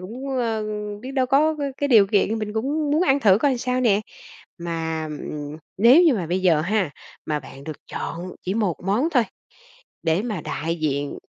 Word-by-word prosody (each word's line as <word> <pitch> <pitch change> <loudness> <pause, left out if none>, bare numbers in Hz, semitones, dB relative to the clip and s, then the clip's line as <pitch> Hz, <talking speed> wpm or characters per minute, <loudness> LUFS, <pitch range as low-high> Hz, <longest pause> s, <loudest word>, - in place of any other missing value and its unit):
cũng, 235 +9 -7
ơ, 225 -3 -1 0.4
biết 260 - -6
đâu 260 -2 +2
có 300 +5 +3
c - - -14 0.2
cái 285 - -1
điều 220 -6 +7
kiện 210 +2 +1
mình 215 -1 -4
cũng 285 +7 -1
muốn 305 +4 +3
ăn 280 -5 +3
thử 200 -3 +5
coi 265 -1 +2
sao 250 +1 -1
nè. 210 -5 +3 0.6
Mà, 165 -2 -3
ừm, 150 0 -6 0.2
nếu 240 - +7
như 325 -6 +5
mà 185 -7 -2
bây 180 +3 -1
giờ 165 -5 +4
ha, 190 -1 0 0.4
mà 150 -1 -1
bạn 135 0 -12
được 155 -1 -6
chọn 175 +2 -5
chỉ 190 +2 -2
một 205 -7 0
món 225 +11 +1
thôi 250 -7 +3 0.8
để 165 +4 +1
mà 215 -7 -3
đại 160 +3 -3
diện 145 -2 -1
210 Hz, 195 wpm, -23 LUFS, 165-255 Hz, 0.8 s, điều